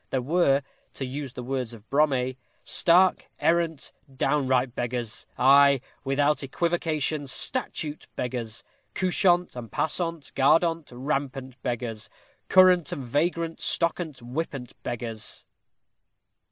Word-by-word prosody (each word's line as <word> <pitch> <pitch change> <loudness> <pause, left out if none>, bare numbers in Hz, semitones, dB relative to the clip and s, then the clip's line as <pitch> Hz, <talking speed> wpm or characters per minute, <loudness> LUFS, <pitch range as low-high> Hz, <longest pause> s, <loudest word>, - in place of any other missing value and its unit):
There 130 - 0
were, 145 -2 +3 0.3
to 135 - -3
use 135 0 -5
the 125 - -6
words 125 -2 -3
of 110 -1 -17
Brome 135 -3 +2 0.3
Stark, 180 +2 +4
errant, 165 -3 +1 0.3
downright 130 -3 +1
beggars. 120 -2 -4
Ay, 140 +1 +6 0.2
Without 145 +1 +1
equivocation, 155 -1 -1
statute 155 - -2
beggars, 120 -3 -4 0.3
Couchant 180 -2 +2
and 115 -4 -8
passant, 165 -2 -2
guardant, 165 +4 +3
rampant 135 0 -3
beggars; 120 -3 -4 0.4
Current 185 -4 +6
and 135 - -4
vagrant, 165 +5 -1
stockant, 170 -3 0
whippant 125 0 -5
beggars! 115 -3 -6
140 Hz, 105 wpm, -26 LUFS, 125-165 Hz, 0.4 s, Ay